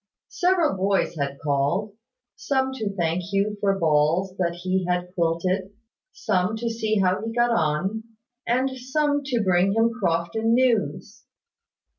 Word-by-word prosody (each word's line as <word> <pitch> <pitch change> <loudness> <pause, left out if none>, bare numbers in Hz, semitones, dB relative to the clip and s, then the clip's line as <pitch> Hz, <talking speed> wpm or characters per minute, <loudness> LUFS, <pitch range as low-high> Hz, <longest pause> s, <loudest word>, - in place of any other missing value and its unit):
Several 350 - +1
boys 195 -1 0
had 140 -2 -3
called; 145 +9 0 0.4
some 265 +5 -1
to 220 -6 -3
thank 170 -1 0
Hugh 200 +3 -1
for 195 -1 +2
balls 165 +3 +1
that 170 -2 0
he 185 0 0
had 180 0 -1
quilted; 185 +3 -1 0.4
some 185 +4 0
to 230 +1 -2
see 220 -1 -1
how 185 +1 +1
he 225 - -3
got 240 +1 +2
on; 190 +4 0 0.4
and 255 +3 +2
some 285 +3 0
to 250 -5 0
bring 185 +1 +3
him 225 +1 +3
Crofton 220 +2 0
news. 245 -4 0
195 Hz, 140 wpm, -24 LUFS, 175-230 Hz, 0.4 s, bring